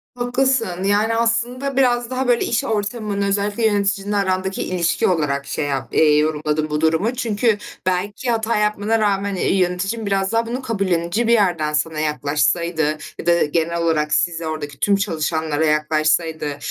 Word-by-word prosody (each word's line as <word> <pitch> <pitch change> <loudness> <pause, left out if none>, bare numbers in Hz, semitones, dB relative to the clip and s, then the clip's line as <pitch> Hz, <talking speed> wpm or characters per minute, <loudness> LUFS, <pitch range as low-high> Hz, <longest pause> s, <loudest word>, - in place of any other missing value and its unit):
Haklısın, 245 -6 0
yani, 210 +3 +2
aslında 240 +4 0
biraz 245 -3 +2
daha, 260 0 -2
böyle, 240 -1 +2
iş 235 - 0
ortamın, 210 -1 -2
özellikle 205 +3 0
yöneticinle 205 -1 0
arandaki 190 -1 -1
ilişki 175 -2 0
olarak 145 -6 0
şey 140 +2 -3
yap 135 -4 -3
eee, - - +2
diye 150 -1 +5
yorumladım 150 0 0
bu 150 0 -1
durumu. 160 +9 +1
Çünkü 225 -2 +1 0.3
belki 200 +7 -1
hata 225 0 0
yapmana 210 +1 +1
rağmen, 200 -1 0
eee, 185 - 0
yöneticin 190 +5 -1
biraz 195 -1 0
daha 230 0 +1
bunu 245 +3 -3
kabullenince 195 -2 -1
bir 235 - +4
yerden 175 -8 +1
sana 155 +1 -1
yaklaşsaydı 155 +1 0 0.2
ya - - -6
da 170 0 +4
genel 170 +2 -1
olarak 155 -2 +1
size, 160 +2 0
oradaki 145 -3 -5
tüm 200 - +3
çalışanlara 160 -5 -1
yaklaşsaydı, 155 0 0
190 Hz, 160 wpm, -20 LUFS, 155-220 Hz, 0.3 s, diye